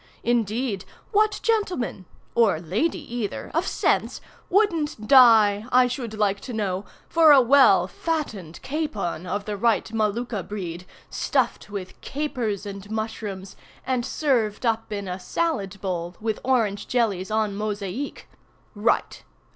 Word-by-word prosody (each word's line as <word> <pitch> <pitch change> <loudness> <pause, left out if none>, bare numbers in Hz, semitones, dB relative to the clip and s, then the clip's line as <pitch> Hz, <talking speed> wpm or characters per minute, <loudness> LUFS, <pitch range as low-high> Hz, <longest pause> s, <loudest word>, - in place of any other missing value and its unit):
Indeed 230 -2 0 0.3
what 425 -1 +2
gentleman 370 - -1 0.3
(or 225 -9 +3
lady 220 - -2
either) 215 -4 -4
of - - 0
sense, - - 0 0.3
wouldn't 330 - +1
die, 220 -5 +6
I 255 0 +6
should 245 -3 -4
like 205 -2 +1
to 250 - -8
know, 200 -3 -2 0.2
for 320 -2 +6
a 285 - +9
well 250 -8 +6
fattened 205 - -4
capon 210 - -3
of 205 +3 -3
the 210 - -3
right 225 +2 +2
Molucca 220 0 -1
breed, 180 -3 -6 0.2
stuffed - - -1
with 195 -3 -7
capers 245 -9 -3
and 200 0 -8
mushrooms, 215 -3 -5 0.3
and 255 -2 0
served 245 -6 0
up 225 -1 0
in 200 -2 -4
a 180 +1 -4
salad 200 - -2
bowl, 175 -2 -3
with 220 -1 -2
orange 225 -6 +1
jellies 205 -7 0
en 215 -2 0
mosaïques. 210 +4 -4 0.5
Write! 220 +3 0
215 Hz, 130 wpm, -24 LUFS, 200-255 Hz, 0.5 s, a